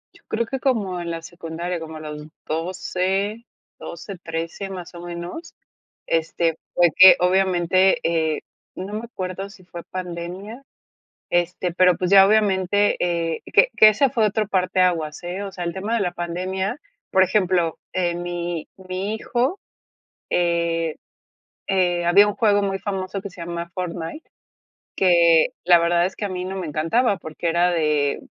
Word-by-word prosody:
Yo -, -, -21 dB
creo 230 Hz, +1 st, 0 dB
que 265 Hz, +4 st, -4 dB
como 205 Hz, -10 st, 0 dB
en 170 Hz, -1 st, -4 dB
la 165 Hz, -, -4 dB
secundaria. 170 Hz, 0 st, -5 dB
Como 160 Hz, -1 st, -8 dB
a -, -, -8 dB
los 150 Hz, -1 st, -7 dB, 0.2 s
12. 185 Hz, +6 st, -2 dB, 0.4 s
12, 180 Hz, +3 st, -8 dB
13, 165 Hz, +4 st, -4 dB
más 180 Hz, -2 st, -8 dB
o 170 Hz, -, -8 dB
menos, 175 Hz, -, -7 dB, 0.5 s
este, 165 Hz, 0 st, 0 dB, 0.2 s
fue 175 Hz, -1 st, +4 dB
que, 185 Hz, 0 st, +10 dB
obviamente, 185 Hz, 0 st, +3 dB
eh, 160 Hz, -2 st, 0 dB, 0.3 s
no 190 Hz, +3 st, -6 dB
me 220 Hz, +2 st, -4 dB
acuerdo 190 Hz, -3 st, -5 dB
si 195 Hz, -2 st, -16 dB
fue 175 Hz, -1 st, -9 dB
pandemia, 185 Hz, +6 st, -6 dB, 0.7 s
este, 175 Hz, 0 st, 0 dB
pero 180 Hz, -1 st, +4 dB
pues 180 Hz, 0 st, -2 dB
ya 195 Hz, -1 st, +9 dB
obviamente, 205 Hz, -1 st, +2 dB
eh 170 Hz, -2 st, -1 dB
que -, -, +5 dB
que 215 Hz, -, +9 dB
ese 235 Hz, +5 st, +3 dB
fue 230 Hz, -5 st, +1 dB
otro 215 Hz, +1 st, 0 dB
parteaguas, 180 Hz, -5 st, +1 dB
eh, 180 Hz, +3 st, -4 dB
o 200 Hz, -, -5 dB
sea, 180 Hz, -2 st, -6 dB
el 170 Hz, +1 st, -3 dB
tema 205 Hz, +4 st, -2 dB
de -, -, 0 dB
la 180 Hz, -3 st, -1 dB
pandemia 185 Hz, -, -3 dB, 0.3 s
por 190 Hz, -, +4 dB
ejemplo, 180 Hz, -5 st, +1 dB, 0.2 s
eh, 175 Hz, -2 st, 0 dB
mi 175 Hz, -1 st, -4 dB
mi 190 Hz, +2 st, -4 dB
hijo, 255 Hz, -, -1 dB, 0.7 s
eh, 170 Hz, -2 st, 0 dB, 0.7 s
eh, 180 Hz, -3 st, +1 dB
había 200 Hz, +4 st, +6 dB
un 205 Hz, -, -2 dB
juego 205 Hz, -2 st, +3 dB
muy 195 Hz, -1 st, -1 dB
famoso 195 Hz, -1 st, -4 dB
que 200 Hz, 0 st, -8 dB
se 180 Hz, -, -13 dB
llama 170 Hz, 0 st, -5 dB
Fortnite, 180 Hz, -, -5 dB, 0.7 s
que 170 Hz, -3 st, +5 dB
la 175 Hz, -1 st, +6 dB
verdad 170 Hz, +1 st, +2 dB
es -, -, -10 dB
que 210 Hz, -, -4 dB
a 200 Hz, -, -3 dB
mí 180 Hz, -1 st, -4 dB
no 190 Hz, +1 st, -5 dB
me 185 Hz, -, -4 dB
encantaba 195 Hz, -, +1 dB
porque 160 Hz, +1 st, -4 dB
era 175 Hz, +2 st, +3 dB
de 150 Hz, -4 st, +1 dB
180 Hz, 165 wpm, -22 LUFS, 170-195 Hz, 0.7 s, que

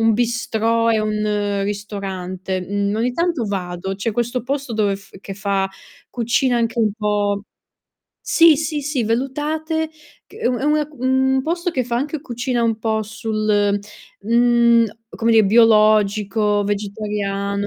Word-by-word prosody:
un 225 Hz, 0 st, +4 dB
bistrot 230 Hz, 0 st, +1 dB
e 220 Hz, -, +2 dB
un 210 Hz, -1 st, -1 dB
ristorante, 190 Hz, -2 st, -4 dB
mhmm, 200 Hz, +1 st, -1 dB
ogni 240 Hz, +2 st, 0 dB
tanto 335 Hz, -3 st, 0 dB
vado. 185 Hz, -1 st, -3 dB
C'è 200 Hz, +4 st, -2 dB
questo 240 Hz, +2 st, -2 dB
posto 275 Hz, 0 st, -3 dB
dove 205 Hz, -3 st, +1 dB
f 195 Hz, -1 st, -18 dB
che 195 Hz, -, -7 dB
fa 195 Hz, -1 st, -1 dB, 0.4 s
cucina 240 Hz, +1 st, +1 dB
anche 230 Hz, 0 st, 0 dB
un 215 Hz, -2 st, +3 dB
po' 205 Hz, -1 st, 0 dB, 0.8 s
sì, 330 Hz, -3 st, +6 dB
sì, 310 Hz, 0 st, -2 dB
sì 280 Hz, -3 st, -1 dB
vellutate 300 Hz, +7 st, -1 dB, 0.4 s
c -, -, -17 dB
è -, -, -2 dB
una 295 Hz, +5 st, +1 dB
un 265 Hz, +1 st, +2 dB
posto 345 Hz, +3 st, -1 dB
che 260 Hz, -, 0 dB
fa 235 Hz, 0 st, -2 dB
anche 290 Hz, +4 st, -2 dB
cucina 245 Hz, -2 st, -2 dB
un 225 Hz, -1 st, +1 dB
po' 220 Hz, -1 st, 0 dB
sul, 215 Hz, -1 st, 0 dB, 0.4 s
mhmm, 235 Hz, +1 st, +4 dB, 0.2 s
a -, -, -12 dB
come 230 Hz, 0 st, +2 dB
di 220 Hz, -1 st, +6 dB
biologico, 210 Hz, -1 st, +3 dB
vegetariano. 200 Hz, -1 st, -2 dB
220 Hz, 145 wpm, -20 LUFS, 205-245 Hz, 0.8 s, sì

